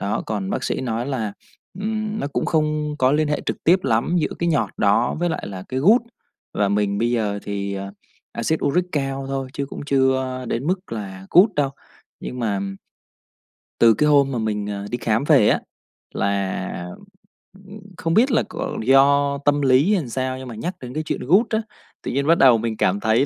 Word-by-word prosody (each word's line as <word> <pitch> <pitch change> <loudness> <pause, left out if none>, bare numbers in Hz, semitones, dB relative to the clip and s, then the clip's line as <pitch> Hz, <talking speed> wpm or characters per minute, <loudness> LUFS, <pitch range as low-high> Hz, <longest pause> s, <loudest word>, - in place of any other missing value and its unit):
Đó, 100 - -2
còn 100 -3 -3
bác - - -2
sĩ - - -1
nói 120 0 -2
là, 115 -7 -2 0.5
ừm, 215 0 -2
nó - - -2
cũng - - -2
không 150 -1 0
có 130 +1 +3
liên 155 0 +2
hệ 150 - 0
trực - - -4
tiếp 180 +3 +5
lắm 120 +8 +1
giữa 155 - -1
cái 170 - 0
nhọt 115 -11 +1
đó 105 +4 +2
với 175 - +1
lại - - -4
là 95 -2 -7
cái 130 +1 -2
gút 220 - +5 0.5
và 100 -1 +1
mình 100 0 0
bây 120 +1 +1
giờ 105 -4 0
thì, 100 -1 -4
ờ, 100 0 -6 0.4
Axit 155 +7 -1
uric 175 +6 +2
cao 135 -1 -2
thôi 135 -1 -3
chứ 140 -1 -3
cũng - - -8
chưa 130 -2 +1
đến 125 +6 -2
mức 185 -5 -2
là 95 -3 -6
gút 185 +6 +6
đâu. 140 -2 +1 0.5
Nhưng 125 - -6
mà 100 -4 -1 1.2
từ 115 -1 +7
cái 150 +8 +1
hôm 140 -2 +4
mà 125 - -2
mình, 105 -2 -2
ờ, 100 -1 -4
đi 120 - -2
khám 115 +1 0
về 145 -8 +5
á, - - +2 0.5
là, 100 -3 -2 0.8
ừm, 205 +2 -10 0.2
không 165 -1 -1
biết 245 +6 +4
là 230 - +3
có - - -4
do 140 +2 +4
tâm 145 0 +3
lý 135 +8 +4
hay 185 - +2
làm 125 - -8
sao 130 +1 -2
nhưng 130 - -8
mà 120 - -7
nhắc 175 - -4
đến 125 -1 -8
cái 155 - -2
chuyện - - -3
gút 190 - +3
á, 220 0 0 0.4
tự - - -3
nhiên 140 +3 -1
bắt 165 - +5
đầu 125 -4 +6
mình 110 -1 -3
cảm 100 +2 +1
thấy 110 +5 +2
130 Hz, 210 wpm, -22 LUFS, 110-150 Hz, 1.2 s, từ